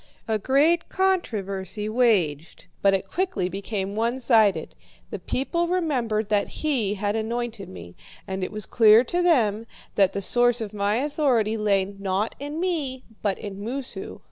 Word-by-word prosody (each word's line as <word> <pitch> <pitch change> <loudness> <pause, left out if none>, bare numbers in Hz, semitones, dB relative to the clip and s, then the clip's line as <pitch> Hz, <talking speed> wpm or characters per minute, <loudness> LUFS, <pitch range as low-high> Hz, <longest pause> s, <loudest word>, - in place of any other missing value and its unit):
A 220 -1 0
great 300 +9 +2
controversy 210 - -1
waged, 200 - +1 0.2
but 195 -1 +4
it 195 0 -4
quickly 365 - -1
became 195 0 -4
one 230 +4 -1
sided. 220 -5 +3 0.4
The - - -4
people 340 +6 -1
remembered 250 - -1
that 205 -1 +1 0.2
he 240 -10 +1
had 205 +1 -1
anointed 230 -1 -3
me, 90 -1 -11 0.3
and 190 0 -3
it - - -3
was 215 -1 -4
clear 220 0 +6
to 350 +8 -1
them 230 - +2 0.3
that 195 -2 +3
the - - -2
source 245 +3 +3
of 215 -2 -5
my 205 0 0
authority 255 -5 +1
lay, 205 -3 +2
not 195 +1 -2
in 290 +3 -5
me, 300 -8 -2 0.2
but 200 -2 0
in 200 -1 -7
Moosu. 260 +4 -5
220 Hz, 155 wpm, -24 LUFS, 200-265 Hz, 0.4 s, clear